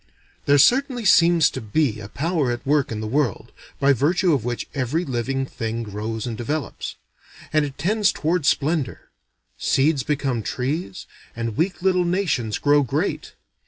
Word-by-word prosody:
There 145 0 +5
certainly 250 - +3
seems 170 -4 +5
to - - -6
be 110 +1 0
a 100 - -8
power 155 - -1
at 120 0 -5
work 145 -2 +1
in 110 -1 -3
the 110 - -4
world, 130 -2 -1 0.3
by 140 0 +4
virtue 170 +7 +2
of 135 -7 0
which 120 0 -3
every 145 +5 -1
living 135 +1 -2
thing 115 -2 -4
grows 110 +1 -4
and 120 -2 -4
develops. 145 +6 -4 0.6
And 155 -1 +3
it 140 -1 -8
tends 200 +5 +2
toward 160 -1 -1
splendor. 150 -2 0 0.5
Seeds 140 +1 +2
become 135 -3 -1
trees, 150 - -3 0.3
and 115 -2 -3
weak 180 - -1
little 185 -1 +3
nations 170 - 0
grow 145 0 +3
great. 140 - -2
140 Hz, 160 wpm, -22 LUFS, 120-165 Hz, 0.6 s, There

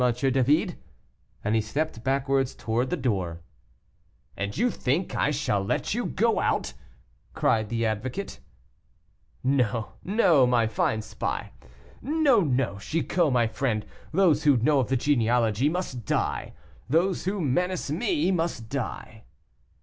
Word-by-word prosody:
David," 135 - +1 0.6
and 105 - 0
he 110 - +3
stepped 135 +2 -3
backwards 135 0 0
towards 115 +4 -1
the - - -1
door. 90 -10 -2 0.9
"And 100 +1 -4
you 240 +4 +2
think 145 +9 -1
I - - +2
shall 145 -9 0
let 100 - -1
you 240 +2 -1
go 230 +3 +1
out," - - 0 0.6
cried 110 -2 +1
the 115 0 -1
advocate. 115 - -3 1.0
"No, 125 -5 +1
no, 175 - +4
my 120 -2 +3
fine 110 0 0
spy; - - -4 0.5
no, 290 -4 +3
no, 130 - 0
Chicot, 165 - 0
my 120 -2 +3
friend, 110 -1 -1 0.3
those 160 -4 +3
who 145 -4 +5
know 140 +5 +3
of 125 - 0
the 130 - +1
genealogy 120 -1 +2
must 160 -8 -4
die. - - -1 0.4
Those 170 +6 +1
who 195 +2 -1
menace 175 +2 0
me 240 - +1
must 165 -11 -2
die." 115 -4 -5
135 Hz, 135 wpm, -26 LUFS, 115-170 Hz, 1.0 s, who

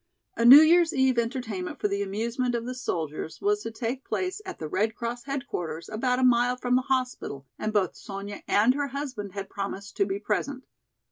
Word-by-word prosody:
A 230 - +1
New 270 +5 +12
Year's 335 +1 +5
eve 265 -2 +3
entertainment 230 -6 -3
for - - +1
the 200 0 -2
amusement 235 +5 -1
of 235 0 -3
the 250 - -3
soldiers 160 - -4
was 415 +1 +1
to - - -4
take 235 +4 -4
place 375 +3 -3
at 375 - -6
the 155 - -5
Red 215 +7 0
Cross 240 +1 -4
headquarters 245 - -4
about 250 +3 0
a 260 - +1
mile 245 0 +4
from 250 0 +1
the 255 - +4
hospital 255 - -2
and 215 - -1
both 205 -3 +1
Sonya 200 +1 -7
and 220 +5 +4
her 285 +1 -1
husband 255 -8 -5
had 195 -1 -5
promised 200 0 -6
to 200 - +2
be 195 0 -2
present. 255 +6 -2
235 Hz, 200 wpm, -27 LUFS, 200-260 Hz, -, New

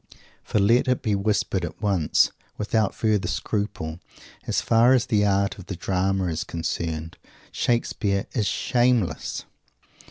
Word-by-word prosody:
For - - -2
let 115 +6 +4
it 125 -1 +1
be 105 - +1
whispered 100 -2 0
at 85 +1 -6
once, 95 -7 +2 0.3
without 105 -1 0
further 105 -5 +1
scruple. 90 -3 -3 0.5
As - - +1
far 115 +3 +4
as 125 - +2
the 110 -5 +2
art 100 0 +1
of 95 - -11
the 95 - -4
drama 95 +1 0
is 85 -1 -2
concerned, 80 -1 -4 0.3
Shakespeare 105 -4 0
is 110 -5 0
_shameless. 120 -5 0
100 Hz, 135 wpm, -24 LUFS, 90-110 Hz, 0.5 s, let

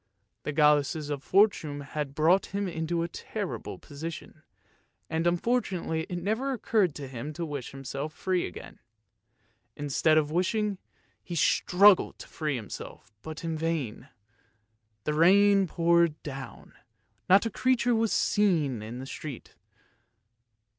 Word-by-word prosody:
The - - -3
goloshes 150 0 +2
of 140 -2 -3
Fortune 175 -7 +2
had 140 0 -5
brought 170 +6 +3
him 200 0 -2
into 165 0 -2
a - - -2
terrible 200 +3 -5
position, 155 +1 -8 0.7
and 165 +1 0
unfortunately 175 -4 0
it 175 - -3
never 235 +7 0
occurred 210 - +1
to 140 -2 -6
him 130 +4 -6
to 170 +2 -4
wish 145 -5 -5
himself 135 +2 -5
free 185 +2 -1
again. 90 - -11 1.0
Instead 145 +2 +2
of 150 -1 +2
wishing, 195 +3 0 0.4
he 175 - -6
struggled 190 +5 +4
to - - -11
free 150 -3 -2
himself, 110 -1 -8
but 160 +5 -8
in 165 -1 -2
vain. 155 -8 -3 0.9
The 150 - -1
rain 195 +4 +5
poured 170 -1 +2
down, 135 -2 -8 0.6
not 195 +4 +6
a 225 - -1
creature 245 +1 +2
was 225 -1 +2
to - - +2
be - - +2 0.2
seen 145 - 0
in 110 +3 -7
the 130 - -6
street. 140 -2 -8
160 Hz, 140 wpm, -28 LUFS, 145-190 Hz, 1.0 s, not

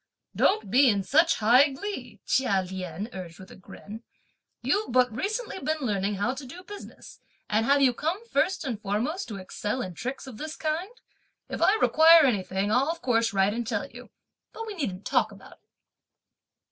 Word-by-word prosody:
"Don't 380 - +2
be 260 +3 +6
in 200 -3 +1
such 320 - +3
high 245 +7 +5
glee!" 265 - -7
Chia 200 -8 +2
Lien 185 +1 -5
urged 180 -3 -8
with 190 - -13
a - - -11
grin, 205 +4 -11 0.6
"you've 340 - 0
but 250 -2 +3
recently 420 - -3
been 310 +1 -1
learning 205 -4 -1
how 205 +6 -1
to 275 - -8
do 340 +8 -10
business, 410 +2 -11 0.3
and 220 +2 +1
have 280 0 +4
you 255 -2 +4
come 335 - -3
first 380 -7 0
and 230 -6 -4
foremost 230 - -2
to 215 - -6
excel 205 +5 -4
in 185 - -6
tricks 255 +11 -5
of 245 -4 -10
this 310 +1 -5
kind? 320 +5 -2 0.6
If - - -5
I 400 - +5
require 325 -5 +6
anything, 195 -4 0
I'll 260 +6 +2
of 330 0 -4
course 230 -2 +2
write 195 +1 +2
and 235 0 -4
tell - - -2
you, - - -12 0.4
but 455 - -6
we 435 - -6
needn't 210 - -4
talk - - +1
about - - -14
it." - - -21
250 Hz, 185 wpm, -27 LUFS, 205-315 Hz, 0.6 s, be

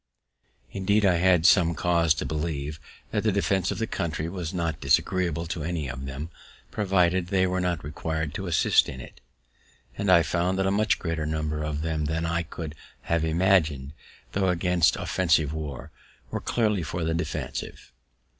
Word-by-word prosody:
Indeed 100 +2 +1
I 90 -3 +4
had 90 -1 +3
some 85 -4 +5
cause 85 -3 +2
to - - -3
believe 75 -1 -3 0.3
that - - 0
the 110 - +2
defense 95 -2 +1
of - - -2
the 115 - -1
country 80 -6 -3
was 85 -2 -4
not 85 -5 -2
disagreeable 85 +4 +1
to 85 -1 -4
any 80 -3 -2
of 65 +1 -6
them, 70 +5 -6 0.4
provided 95 -3 +2
they 95 0 +2
were 90 0 0
not 90 -4 -1
requir'd 80 0 -3
to 95 - -4
assist 85 - +3
in 65 - -7
it. - - -12 0.7
And 100 -2 +1
I 85 -2 +7
found 90 +4 0
that 95 - +1
a 95 - +2
much 110 +3 +2
greater 80 -2 -3
number 75 0 -2
of 75 0 -3
them 80 -2 -1
than 80 +2 -1
I 85 +1 0
could 80 -1 -7 0.4
have 85 -1 +2
imagined, 80 -5 +2 0.4
tho' 95 -1 +1
against 90 -2 +2
offensive 80 -5 +1
war, 75 -5 -6 0.4
were - - -3
clearly 105 -5 +1
for 85 +2 -3
the 80 0 0
defensive. 85 - -4
85 Hz, 175 wpm, -26 LUFS, 80-95 Hz, 0.7 s, I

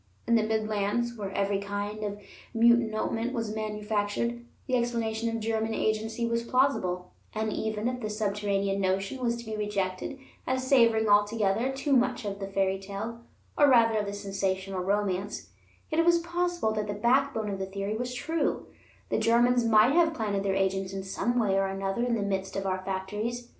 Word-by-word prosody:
In - - +1
the 230 - +5
Midlands, 220 +2 0
where 205 -3 -4
every 200 0 0
kind 205 +1 -4
of 205 0 -4 0.4
munitionment 230 0 +2
was 225 -4 -2
manufactured, 215 +2 -2 0.2
the 255 - 0
explanation 230 -2 0
of 230 0 -2
German 220 0 -1
agency 220 +2 -1
was 230 0 0
plausible; 235 -8 0 0.2
and 215 -1 -1
even 220 +1 -2
if 250 0 -3
the 215 - -3
subterranean 200 -2 -1
notion 195 +6 -1
was 235 -1 +1
to 235 - -9
be 220 0 -4
rejected 205 +3 -2 0.3
as 260 0 0
savoring 230 -4 +4
altogether 210 +3 +3
too 275 +2 -1
much 250 -2 +1
of 200 -1 -4
the 195 - -4
fairytale, 195 +3 -2 0.4
or 290 -1 +5
rather 230 -3 +5
of 205 - -2
the 200 - -4
sensational 195 -1 -2
romance, 200 +1 -1 0.4
yet 315 - +1
it 330 - +4
was 345 0 +6
possible 345 -6 -1
that 215 -1 -2
the 205 - -3
backbone 235 -1 +1
of 195 - -4
the 190 - -3
theory 200 +2 -3
was 250 +2 -3
true; 320 +3 -1 0.4
the - - +1
Germans 240 +1 +3
might 225 +3 +5
have 325 -1 +3
planted 205 -5 -1
their 195 -1 0
agents 190 0 0
in 195 0 -4
some 240 +5 -1
way 210 -5 +2
or 195 0 +2
another 195 +3 -2
in 245 -1 +1
the 210 - -1
midst 195 -1 -2
of 195 0 -2
our 185 -1 -1
factories. 210 +6 -3
215 Hz, 180 wpm, -28 LUFS, 200-235 Hz, 0.4 s, was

